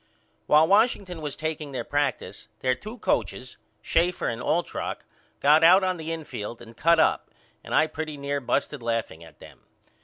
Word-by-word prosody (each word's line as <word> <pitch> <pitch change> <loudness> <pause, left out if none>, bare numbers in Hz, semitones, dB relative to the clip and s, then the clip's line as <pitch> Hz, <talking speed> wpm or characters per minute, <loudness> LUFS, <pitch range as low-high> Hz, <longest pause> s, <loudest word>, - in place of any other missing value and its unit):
While 155 +2 +5
Washington 200 -4 +2
was 150 -2 -4
takeing 155 -2 -4
their 130 - -3
practice 145 -2 -2
their 130 -1 +2
two 215 - -9
coachers 130 - -2 0.3
Schaefer 175 +2 +1
and 115 +1 -4
Altrock 160 +7 -2 0.4
got 150 +3 +5
out 185 +4 +7
on 185 -1 0
the 160 0 -5
infield 125 -9 -6
and 115 -1 -13
cut 165 +6 +3
up - - +2 0.3
and - - -3
I 155 - +5
pretty 155 -1 -6
near 140 0 -3
busted 140 +2 -1
laughing 115 -8 -3
at 80 -2 -16
them. - - -15
150 Hz, 165 wpm, -25 LUFS, 130-165 Hz, 0.4 s, out